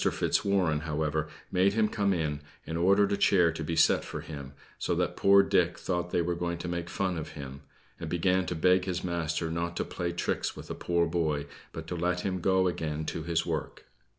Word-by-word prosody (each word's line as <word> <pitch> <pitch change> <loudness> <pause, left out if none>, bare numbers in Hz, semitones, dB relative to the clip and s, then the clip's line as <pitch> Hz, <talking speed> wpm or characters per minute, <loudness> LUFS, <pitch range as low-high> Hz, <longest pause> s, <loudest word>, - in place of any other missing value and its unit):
Fitzwarren, 90 -6 +1
however, 75 0 -1 0.2
made 95 +1 +3
him 110 0 +3
come 105 -2 0
in, 80 -5 -1 0.3
and 80 - -4
ordered 100 +4 +4
a 100 - +1
chair 90 -4 +4
to 80 0 -5
be 80 +2 -2
set 80 0 +4
for - - -6
him, 70 -3 -8 0.3
so - - 0
that - - 0
poor 100 0 +6
Dick 90 -2 +2
thought 90 -1 -2
they 85 - +1
were 85 +1 -1
making 85 0 -3
fun 95 -3 -1
of 80 - -7
him, 70 -2 -8 0.4
and 80 -2 -5
began 90 +2 +1
to 90 - -2
beg 90 +3 +3
his 90 -2 -2
master 85 -2 -1
not 85 +1 -2
to - - -1
play 85 -1 -3
tricks 85 - -2
with - - -9
a - - -1
poor 85 -1 +1
boy, 80 -4 0 0.3
but 80 - -7
to 90 - -4
let 90 +1 0
him 95 -1 -2
go 95 +1 +3
again 80 -3 -2
to 80 - -3
his 85 +1 0
work. - - -4
85 Hz, 205 wpm, -29 LUFS, 80-90 Hz, 0.4 s, poor